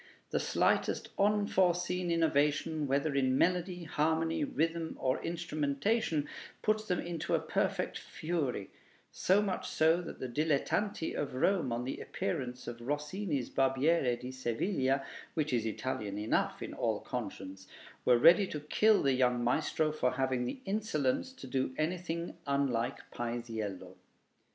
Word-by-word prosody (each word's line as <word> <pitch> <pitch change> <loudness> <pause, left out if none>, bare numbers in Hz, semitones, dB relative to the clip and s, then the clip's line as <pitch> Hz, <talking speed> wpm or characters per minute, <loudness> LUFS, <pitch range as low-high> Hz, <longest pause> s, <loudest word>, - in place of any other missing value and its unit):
The - - +1
slightest - - +1
unforeseen 185 -3 +2
innovation, 155 -1 +2
whether 140 +2 +1
in 130 -1 +2
melody, 180 +1 +1
harmony, 160 - +1
rhythm, 165 - -1
or 130 -1 0
instrumentation, 160 +1 0 0.4
puts 215 0 +1
them 180 - +1
into 170 -2 -1
a - - +2
perfect - - -1
fury; 155 - -3 0.4
so 195 +3 +3
much 190 -3 -2
so, 160 +2 +3
that 170 - -8
the 130 - -3
dilettanti 155 - 0
of 140 -3 -3
Rome, 160 -1 +2
on 120 +1 -1
the 130 - -4
appearance 130 -9 -3
of 120 0 -6
Rossini's 150 - -2
'Barbiere 135 0 +2
di 125 +1 -6
Seviglia' 130 - 0 0.3
(which 155 -4 0
is 115 -2 +1
Italian 105 -3 -3
enough 105 +1 0
in - - -6
all - - -1
conscience), 95 0 -6 0.4
were 125 -1 +5
ready 175 +10 +7
to 150 - -4
kill 210 +8 +3
the 135 -1 +3
young 125 -1 +2
maestro 155 +4 +1
for 130 -5 0
having 130 -1 0
the 255 - -5
insolence 195 - 0
to 260 - -11
do 130 0 -1
anything 170 +1 -2
unlike 135 -3 +1
Paisiello. 115 -5 -4
150 Hz, 135 wpm, -32 LUFS, 130-175 Hz, 0.4 s, ready